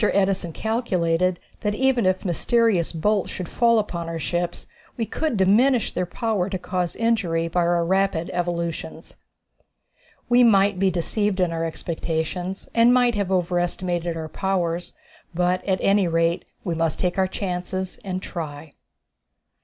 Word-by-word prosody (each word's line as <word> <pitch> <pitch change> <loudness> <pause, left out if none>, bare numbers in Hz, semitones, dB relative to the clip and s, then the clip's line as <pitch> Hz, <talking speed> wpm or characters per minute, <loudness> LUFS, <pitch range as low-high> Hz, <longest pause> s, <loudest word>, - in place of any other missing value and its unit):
Edison 195 -4 +1
calculated 185 -5 0 0.2
that 210 -1 -1
even 260 -4 +2
if 185 +1 0
mysterious 195 0 +2
bolts 200 +4 0
should 180 - -5
fall 235 -1 +3
upon 170 -6 -2
our 165 - -3
ships 175 +3 -2 0.3
we 230 - 0
could 300 0 -2
diminish 225 +6 +3
their 180 - -1
power 205 -1 -1
to 190 - -2
cause 180 -1 -3
injury 190 -8 +1
by 170 +2 -1
our 170 0 +2
rapid 190 -2 +1
evolutions. 170 -2 -3 1.1
We 245 +1 +5
might 200 -4 +4
be 195 0 +3
deceived 190 +3 -1
in 180 -2 +2
our 165 0 -2
expectations, 165 +3 -3
and 235 +1 +5
might 245 -1 +4
have 200 -3 -1
overestimated 175 -1 -1
our 160 -1 -4
powers, 175 -1 -2 0.4
but 180 +1 +1
at 190 -2 +1
any 195 -2 +3
rate 165 +1 +1 0.2
we 175 - -2
must 165 -1 -1
take 180 +1 0
our 190 - +3
chances 185 0 -4
and 185 -1 -4
try. 150 -3 -6
185 Hz, 145 wpm, -23 LUFS, 170-205 Hz, 1.1 s, We